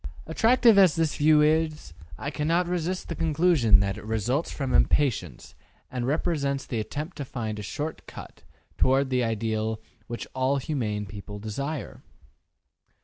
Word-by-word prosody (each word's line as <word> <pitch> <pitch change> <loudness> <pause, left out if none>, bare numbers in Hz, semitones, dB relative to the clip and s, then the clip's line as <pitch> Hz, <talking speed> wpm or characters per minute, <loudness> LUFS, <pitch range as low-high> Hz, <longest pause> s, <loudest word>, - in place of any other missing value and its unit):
Attractive 225 +5 +4
as 185 -6 +6
this 160 -2 0
view 150 0 +5
is, 155 - +1 0.2
I 140 - -4
cannot 165 +4 0
resist 180 +1 -2
the - - -3
conclusion 155 - +3
that 100 +1 -2
it - - -12
results 110 - -1
from 135 -3 -3
impatience 90 - +1 0.4
and 125 -2 -3
represents 140 -2 -1
the 120 - -3
attempt 150 - -5
to 145 - -3
find 110 -5 -5
a - - -4
short 150 +9 -5
cut - - -11 0.4
toward 135 +1 +3
the 125 -1 +2
ideal 110 -1 -1 0.3
which 120 0 -5
all 130 +2 +1
humane 115 -8 -2
people 105 +1 -9
desire. 135 +8 -5
140 Hz, 145 wpm, -26 LUFS, 110-155 Hz, 0.4 s, as